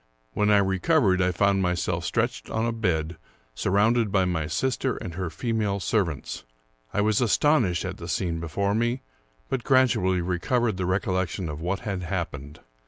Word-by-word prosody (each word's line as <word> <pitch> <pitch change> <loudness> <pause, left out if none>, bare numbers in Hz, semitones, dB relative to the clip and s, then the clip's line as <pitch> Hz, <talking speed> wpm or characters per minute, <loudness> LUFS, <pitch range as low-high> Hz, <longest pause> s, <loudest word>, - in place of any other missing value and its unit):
When 105 +11 +1
I 105 - +6
recovered, 95 - +2
I 90 0 +2
found 100 +2 +2
myself 90 -2 -1
stretched - - -1
on 110 +1 -1
a 115 - 0
bed, 85 -7 -1 0.4
surrounded 105 - +2
by 95 -2 +3
my 80 -4 -1
sister 130 - -1
and 85 - -6
her 90 0 -3
female 105 +1 -1
servants. 90 -5 -1 0.5
I 105 - 0
was 105 +1 +2
astonished 115 - +2
at 95 +1 -5
the 85 - -8
scene 85 -1 -1
before 100 +5 -1
me, 120 +4 0 0.4
but 130 -3 -2
gradually 110 -9 +3
recovered 95 +5 0
the 90 -1 -1
recollection 95 -2 -1
of 75 +1 -6
what 90 +3 -2
had 100 -6 -3
happened. 75 -3 -5
95 Hz, 165 wpm, -26 LUFS, 90-110 Hz, 0.5 s, I